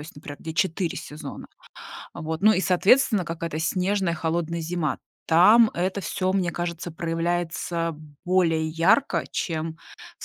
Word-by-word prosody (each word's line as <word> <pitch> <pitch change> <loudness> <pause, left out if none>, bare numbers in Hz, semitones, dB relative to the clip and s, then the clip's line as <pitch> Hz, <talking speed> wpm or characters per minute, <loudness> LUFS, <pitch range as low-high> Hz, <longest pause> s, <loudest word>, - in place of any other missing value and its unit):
есть, 150 +1 -10
например, 145 -1 -9
где 160 -1 -6
4 175 0 0
сезона. 150 +1 -8 0.7
Вот. 160 +1 -5
Ну 215 +1 +7
и, 190 - +1
соответственно, 200 +3 +3
какая-то 165 -2 -4
снежная 185 +1 0
холодная 170 +1 -2
зима. 165 -3 -2 0.3
Там 215 +7 +6
это 185 +3 -1
всё, 185 0 -1
мне 185 -2 0
кажется, 175 0 -4
проявляется 165 -1 -2 0.3
более 170 -3 +2
ярко, 185 - +2
чем 160 -1 -3 0.4
в - - -9
170 Hz, 135 wpm, -25 LUFS, 160-185 Hz, 0.7 s, Ну